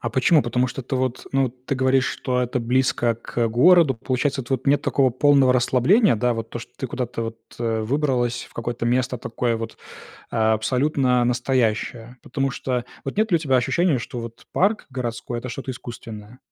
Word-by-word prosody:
А 115 - -3
почему? 135 +6 +4
Потому 125 +1 0
что 135 - -6
ты, 130 - -4
вот, 130 -1 -2
ну, 135 -1 +2
ты 130 +2 -5
говоришь, 130 0 +2
что 125 -2 -1
это 125 0 -1
близко 120 -1 +1
к 115 0 -2
городу. 145 +5 +5
Получается, 130 +3 -1
тв 130 +1 -1
нет 145 +1 +3
такого 135 -2 +2
полного 135 +1 +4
расслабления, 130 - +4
да? 120 +2 +1
Вот 115 0 -5
то, - - -5
что 115 - -11
ты 130 - -4
куда-то 120 -1 -4
вот, 115 0 -5 0.2
э, 115 -1 -1
выбралась, 125 -1 0
в - - -23
какое-то 120 0 -3
место 125 +1 0
такое 115 0 -1
вот, 115 0 -6 0.5
а, 110 -1 +2
абсолютно 125 +2 +1
настоящее? 120 -1 -1
Потому 135 +2 -2
что, 125 -2 -2 0.2
вот 135 - -5
нет 215 +1 +1
ли 175 - +5
у - - +1
тебя 140 -5 +1
ощущения, 155 +4 +2
что 120 +1 -6
вот 115 0 -9
парк 210 +4 +1
городской 120 -1 -4
это 125 - -6
что-то 130 +2 -5
искусственное? 115 -2 -9
125 Hz, 190 wpm, -23 LUFS, 120-135 Hz, 0.5 s, городу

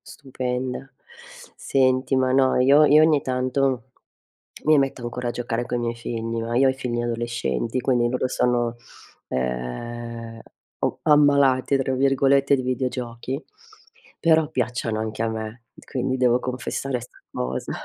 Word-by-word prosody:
stupenda. 130 -1 -5 0.7
Senti, 130 0 +1
ma 130 -1 +2
no, 130 -1 +3
io 140 +4 +6
io 150 +1 +6
ogni 155 -2 +4
tanto 130 -1 -1 0.7
mi 155 -1 +5
metto 135 -3 -1
ancora 120 +1 -4
a - - 0
giocare 120 0 -3
coi 120 - -1
miei 120 -1 -1
figli, 115 -1 -4
ma 115 +1 -3
io 135 - +5
ho - - +4
i - - -5
figli 125 -3 -3
adolescenti, 120 - -2
quindi 120 -2 +1
loro 130 +1 -1
sono 120 -2 0 0.5
ehm, 115 - -4 0.4
o - - -1
ammalati, 140 -3 +4
tra 135 0 -1
virgolette, 135 +1 +3
di 130 - -3
videogiochi, 125 +1 -3 0.7
però 160 -2 +4
piacciono 120 -5 -2
anche 110 0 -4
a 115 - +1
me, 110 +1 -6 0.2
quindi 130 -1 -2
devo 125 -1 +3
confessare 125 0 -3
'sta 125 - -14
cosa. 65 +1 -3
125 Hz, 140 wpm, -23 LUFS, 115-135 Hz, 0.7 s, io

